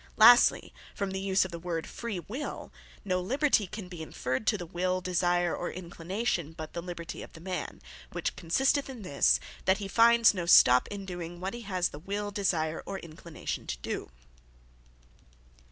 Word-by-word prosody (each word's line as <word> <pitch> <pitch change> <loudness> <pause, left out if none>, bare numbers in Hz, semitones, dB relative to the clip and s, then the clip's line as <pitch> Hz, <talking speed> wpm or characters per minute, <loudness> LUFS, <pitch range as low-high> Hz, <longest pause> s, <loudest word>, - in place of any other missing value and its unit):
Lastly, 240 +3 +7 0.2
from 200 -1 -2
the 190 - -3
use 190 0 +2
of 185 - -7
the 170 - -6
word 165 -2 -3
Freewill, 235 - -6 0.3
no 185 -2 0
liberty 255 0 +2
can 200 0 -7
be 175 -2 -8
inferred 130 +3 -3
to 210 - +3
the 175 - -6
will, 180 +2 -1
desire, 175 -1 +1
or 175 - -3
inclination, 175 -1 -3
but 155 -1 -8
the 170 - -4
liberty 170 -1 -7
of - - -11
the - - -11
man; 180 -2 -5 0.3
which - - -3
consisteth 270 - +1
in 245 -5 -8
this, 140 -6 +3 0.3
that 190 0 +4
he 200 - -5
finds 230 +2 +6
no 175 -3 -4
stop, 125 -7 +7
in 200 -1 -6
doing 175 -2 -6
what 190 +2 -4
he 240 - -6
has 185 -4 -1
the 145 - -10
will, 205 +4 -3
desire, 165 -6 0
or 195 - -3
inclination 165 -1 -7
to - - -3
doe. - - -5
185 Hz, 175 wpm, -29 LUFS, 170-205 Hz, 0.3 s, Lastly